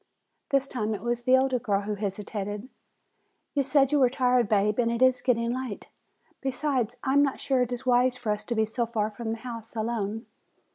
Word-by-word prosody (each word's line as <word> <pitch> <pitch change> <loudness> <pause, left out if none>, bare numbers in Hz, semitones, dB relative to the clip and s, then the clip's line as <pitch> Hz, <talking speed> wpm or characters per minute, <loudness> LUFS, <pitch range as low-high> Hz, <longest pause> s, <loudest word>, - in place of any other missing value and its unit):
This 275 -2 +2
time 220 -5 -2
it - - -8
was 240 0 -1
the 255 0 +6
older 260 -1 +1
girl 205 -4 0
who 210 +1 -3
hesitated. 205 +2 -4 0.8
"You 285 - +2
said 275 0 +3
you 295 - +3
were 255 -2 +5
tired, 250 -3 +2
Bab, 210 +1 +2
and 230 -1 +3
it 235 0 -1
is 255 -1 +4
getting 235 -2 +1
late. 255 -5 -5 0.5
Besides, 255 -3 -1
I 265 - +1
am 285 - +6
not 280 -2 +1
sure 265 -2 +1
it 250 0 0
is 245 0 -4
wise 250 0 +3
for 230 -4 -2
us 210 - -2
to 235 - -2
be 220 0 +2
so 230 +2 -2
far 220 -2 -1
from 225 +2 -6
the 225 - -2
house 230 -1 -8
alone." 220 0 -2
240 Hz, 210 wpm, -27 LUFS, 220-255 Hz, 0.8 s, the